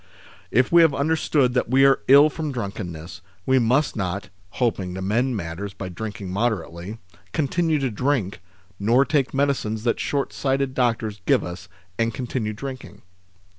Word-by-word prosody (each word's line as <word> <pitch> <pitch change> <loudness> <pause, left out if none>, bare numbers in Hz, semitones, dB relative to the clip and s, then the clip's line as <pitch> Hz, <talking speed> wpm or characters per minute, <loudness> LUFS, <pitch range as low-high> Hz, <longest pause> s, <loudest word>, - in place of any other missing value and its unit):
If 125 +2 +2
we 170 0 +7
have 160 -4 +4
understood 145 -3 +1
that 125 -2 0
we 135 +2 +5
are 135 0 +5
ill 145 +3 +7
from 155 0 -4
drunkenness, 100 - -6 0.2
we 130 0 +4
must 125 +5 +2
not 95 -1 -3 0.2
(hoping 95 -5 -1
to 95 - -5
mend 120 +5 0
matters 95 +3 -5
by 95 - -6
drinking 100 0 -6
moderately) 100 -2 -2 0.4
continue 160 +1 +1
to 135 -3 -1
drink, 115 -5 -1 0.4
nor 120 +7 +4
take 140 -3 +1
medicines 135 -6 0
that 115 - 0
shortsighted 135 -1 -1
doctors 115 -5 -1
give - - +4
us 90 +3 -8 0.3
and 115 0 0
continue 125 -4 -3
drinking. 130 +3 -8
120 Hz, 150 wpm, -23 LUFS, 100-135 Hz, 0.4 s, we